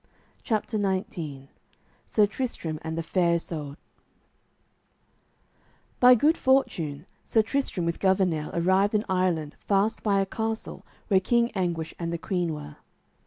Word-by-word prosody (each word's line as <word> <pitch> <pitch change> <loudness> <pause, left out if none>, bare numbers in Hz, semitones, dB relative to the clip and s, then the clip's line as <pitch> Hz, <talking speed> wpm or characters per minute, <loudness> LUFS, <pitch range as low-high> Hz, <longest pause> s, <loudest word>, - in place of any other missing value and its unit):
CHAPTER 215 0 -1
XIX 170 -8 -3 0.6
SIR 210 - +4
TRISTRAM 205 -8 -4
AND 160 0 -4
THE 165 - -2
FAIR 170 0 +2
ISOUD 150 -4 -4 2.2
By 250 0 +8
good 300 +8 +3
fortune 165 - +1 0.2
Sir 220 - +2
Tristram 225 -7 -1
with 170 0 -2
Gouvernail 185 -5 +1
arrived 190 +5 +2
in 210 - +1
Ireland 180 -5 0
fast 205 +2 +1
by 200 -2 +2
a 195 - +2
castle 220 +2 -4 0.3
where 195 -3 +5
King 235 +4 +2
Anguish 170 -4 -2
and 170 -1 -3
the 170 - -2
queen 175 -1 -1
were. 150 0 -9
185 Hz, 130 wpm, -26 LUFS, 165-215 Hz, 2.2 s, By